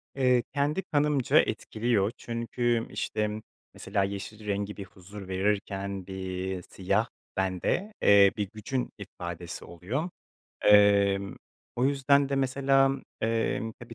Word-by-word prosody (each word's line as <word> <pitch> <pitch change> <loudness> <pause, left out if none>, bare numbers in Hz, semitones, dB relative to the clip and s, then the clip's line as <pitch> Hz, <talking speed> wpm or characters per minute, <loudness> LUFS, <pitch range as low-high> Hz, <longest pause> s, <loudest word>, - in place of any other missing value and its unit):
Eee, 125 -2 +3
kendi 145 +6 +1
kanımca 145 -3 +3
etkiliyor, 110 -2 0
çünkü, 115 0 -1
işte, 105 0 -2 0.3
mesela, 100 - -1
yeşil 100 +2 -5
rengi 100 0 -2
bir 100 - -6
huzur 95 +2 -11
verirken 100 0 -2
bir 95 -1 -4
siyah 100 +5 -1 0.3
bende, 95 - -1
eee, 100 -1 +7
bir 100 -2 -2
gücün 125 +4 -3
ifadesi 85 -3 -7
oluyor. 110 - -4 0.6
Emm, 100 -1 +5 0.4
o 125 - +1
yüzden 140 0 +3
de, 140 - -1
mesela, 135 0 +3 0.3
emm, 115 +1 0
tabii, 120 0 -12
105 Hz, 115 wpm, -28 LUFS, 100-125 Hz, 0.6 s, eee